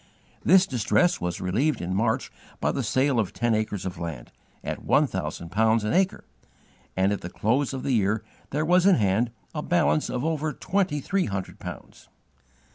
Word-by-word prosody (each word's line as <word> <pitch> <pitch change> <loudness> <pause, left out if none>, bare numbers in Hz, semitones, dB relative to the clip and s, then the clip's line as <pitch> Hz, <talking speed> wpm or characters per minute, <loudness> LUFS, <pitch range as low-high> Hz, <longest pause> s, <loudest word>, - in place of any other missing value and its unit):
This 185 +4 +6
distress 175 - +1
was 90 0 -2
relieved 120 +12 0
in 90 +1 -3
March 110 +5 0 0.3
by - - +1
the - - -2
sale 130 -1 +1
of 105 - -1
ten 120 -1 +1
acres 105 -3 -1
of 95 - -5
land, 80 -8 -6 0.3
at - - -5
one - - +4
thousand 85 0 -5
pounds 110 +2 +3
an 105 - -1
acre, 190 +1 +1 0.7
and 95 +1 +3
at 100 - -4
the 85 - -6
close 125 +9 0
of 130 -2 -5
the - - -1
year 110 -1 +1 0.3
there 150 +3 -1
was 180 +3 +4
in 195 - +7
hand 105 +2 +2 0.2
a - - -3
balance 75 +2 +1
of 125 +3 -2
over 155 -2 -1
twenty 180 -2 -1
three 195 +6 0
hundred 100 -3 -5
pounds. - - -10
115 Hz, 185 wpm, -26 LUFS, 95-155 Hz, 0.7 s, in